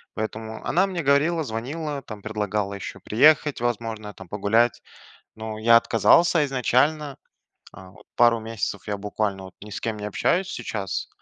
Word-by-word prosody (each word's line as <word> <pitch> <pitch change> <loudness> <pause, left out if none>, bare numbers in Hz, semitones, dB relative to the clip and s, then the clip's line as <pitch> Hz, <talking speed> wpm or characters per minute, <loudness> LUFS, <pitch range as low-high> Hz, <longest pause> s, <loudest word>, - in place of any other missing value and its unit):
Поэтому 110 0 -5
она 190 +3 +2
мне 175 -4 -3
говорила, 155 +4 +2
звонила, 140 +5 -4
предлагала 105 -2 -3
ещё 100 0 -7
приехать, 150 +4 +4
возможно, 115 -3 -3
там, 95 - -12
погулять. 110 +3 +1 0.5
Но 110 0 -6
я 115 +1 +6
отказался 165 +8 +4
изначально. 140 +3 +1 0.6
А 95 -1 -13
вот 95 - -19
пару 120 -1 +4
месяцев 110 -3 -4
я 100 - -1
буквально, 100 -1 -3
вот, 95 - -12
ни 105 - -10
с - - -6
кем 110 -2 -3
не 105 - -5
общаюсь 180 - 0
сейчас. 105 -4 -4
115 Hz, 150 wpm, -24 LUFS, 105-140 Hz, 0.6 s, я